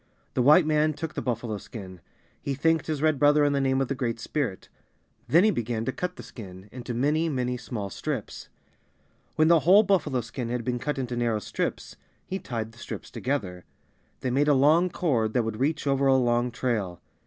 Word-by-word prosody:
The -, -, +1 dB
White 150 Hz, +6 st, +6 dB
man 155 Hz, 0 st, +2 dB
took 155 Hz, +1 st, -5 dB
the -, -, -3 dB
buffalo 115 Hz, -3 st, -3 dB
skin. 95 Hz, -6 st, -10 dB, 0.4 s
He 140 Hz, -, -2 dB
thanked 160 Hz, +4 st, +1 dB
his 155 Hz, -2 st, -2 dB
Red 155 Hz, -3 st, +2 dB
brother 145 Hz, 0 st, +5 dB
in 145 Hz, -, +2 dB
the 140 Hz, -, +1 dB
name 130 Hz, 0 st, +2 dB
of 135 Hz, -, 0 dB
the 135 Hz, -, -1 dB
Great 120 Hz, -4 st, -2 dB
Spirit. 120 Hz, -5 st, -3 dB, 0.6 s
Then 170 Hz, +4 st, +5 dB
he 215 Hz, -, +5 dB
began 115 Hz, -, -2 dB
to 130 Hz, -, 0 dB
cut 180 Hz, +5 st, -4 dB
the -, -, -10 dB
skin 95 Hz, -3 st, -11 dB
into 125 Hz, -1 st, -6 dB
many, 150 Hz, +6 st, +1 dB
many 125 Hz, -3 st, -1 dB
small 105 Hz, -5 st, -5 dB
strips. -, -, -5 dB, 0.9 s
When 155 Hz, -, +4 dB
the 170 Hz, 0 st, +6 dB
whole 190 Hz, +7 st, +6 dB
buffalo 170 Hz, -, +1 dB
skin 115 Hz, +1 st, -5 dB
had 120 Hz, 0 st, -2 dB
been 125 Hz, +1 st, -2 dB
cut 150 Hz, +3 st, -2 dB
into 125 Hz, -2 st, -3 dB
narrow 120 Hz, -2 st, +1 dB
strips, 105 Hz, -, -4 dB, 0.3 s
he 190 Hz, -, -4 dB
tied 115 Hz, -, -4 dB
the 115 Hz, -, -18 dB
strips -, -, -7 dB
together. 100 Hz, -10 st, -3 dB, 0.6 s
They 130 Hz, -2 st, -1 dB
made 140 Hz, +4 st, +2 dB
a 145 Hz, -, +5 dB
long 155 Hz, +7 st, +4 dB
cord 120 Hz, -11 st, 0 dB
that 125 Hz, -, +2 dB
would 110 Hz, 0 st, -4 dB
reach 150 Hz, +4 st, 0 dB
over 135 Hz, 0 st, +2 dB
a 135 Hz, -, +5 dB
long 120 Hz, -1 st, +2 dB
trail. 110 Hz, -7 st, -2 dB
130 Hz, 205 wpm, -26 LUFS, 115-150 Hz, 0.9 s, White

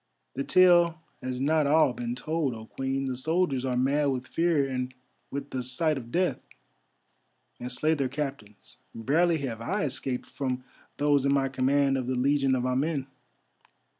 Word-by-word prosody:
"The 135 Hz, -, -2 dB
tale 175 Hz, -1 st, +5 dB, 0.2 s
has 125 Hz, 0 st, -4 dB
not 150 Hz, +2 st, +2 dB
all 150 Hz, -3 st, +4 dB
been 120 Hz, 0 st, -4 dB
told, 150 Hz, -1 st, -2 dB
O 110 Hz, 0 st, -9 dB
Queen. 135 Hz, +3 st, -3 dB
The 130 Hz, -1 st, -2 dB
soldiers 150 Hz, -1 st, 0 dB
are 130 Hz, -2 st, -1 dB
mad 140 Hz, +4 st, +2 dB
with 130 Hz, -2 st, -1 dB
fear 165 Hz, -2 st, +1 dB
and 125 Hz, -1 st, -3 dB, 0.4 s
with 140 Hz, 0 st, -6 dB
the 130 Hz, -, -2 dB
sight 150 Hz, +6 st, 0 dB
of 120 Hz, -3 st, -7 dB
death, 180 Hz, +1 st, 0 dB, 1.2 s
and 125 Hz, +1 st, -5 dB
slay 155 Hz, +6 st, +1 dB
their 140 Hz, -4 st, -1 dB
captains; 135 Hz, -7 st, -6 dB, 0.2 s
barely 160 Hz, +9 st, +2 dB
have 115 Hz, -3 st, -5 dB
I 195 Hz, -, -1 dB
escaped 130 Hz, -2 st, -3 dB
from 130 Hz, -2 st, -3 dB, 0.3 s
those 145 Hz, -1 st, +3 dB
in 140 Hz, -, +2 dB
my 135 Hz, -1 st, +2 dB
command 135 Hz, +1 st, +2 dB
of 125 Hz, -, -4 dB
the 130 Hz, -, 0 dB
Legion 135 Hz, +1 st, +2 dB
of 125 Hz, -1 st, -1 dB
Amen. 135 Hz, +2 st, 0 dB
135 Hz, 165 wpm, -28 LUFS, 125-150 Hz, 1.2 s, tale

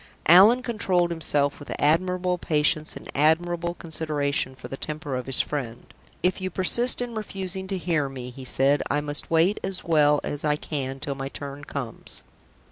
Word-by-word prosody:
Allan 205 Hz, +9 st, +7 dB
controlled 185 Hz, -7 st, +1 dB
himself 145 Hz, -4 st, 0 dB
with 145 Hz, -, -9 dB
admirable 180 Hz, +3 st, +1 dB
patience 155 Hz, 0 st, +1 dB
and -, -, -10 dB
admirable 170 Hz, +3 st, +1 dB
consideration 150 Hz, -5 st, -2 dB
for 125 Hz, -1 st, -10 dB
the 135 Hz, -, -6 dB
temper 150 Hz, -1 st, -5 dB
of 125 Hz, 0 st, -4 dB
his 135 Hz, -, +5 dB
friend. 125 Hz, -6 st, -5 dB, 0.3 s
"If 185 Hz, +1 st, +1 dB
you 185 Hz, -, -2 dB
persist 235 Hz, +7 st, +1 dB
in 240 Hz, -1 st, -6 dB
refusing 190 Hz, -3 st, -5 dB
to 190 Hz, 0 st, -2 dB
hear 165 Hz, -6 st, 0 dB
me," 125 Hz, -2 st, -7 dB
he 130 Hz, +2 st, -10 dB
said, 135 Hz, +3 st, +2 dB
"I 145 Hz, -, +1 dB
must 145 Hz, 0 st, -1 dB
wait 165 Hz, +5 st, +3 dB
as 190 Hz, -1 st, -2 dB
well 150 Hz, -3 st, +4 dB
as 145 Hz, -, -4 dB
I 150 Hz, -1 st, +2 dB
can 135 Hz, -3 st, -4 dB
till 140 Hz, 0 st, -3 dB
my 135 Hz, 0 st, -5 dB
turn 140 Hz, 0 st, -7 dB
comes." 135 Hz, -5 st, -7 dB
155 Hz, 175 wpm, -25 LUFS, 140-180 Hz, 0.3 s, Allan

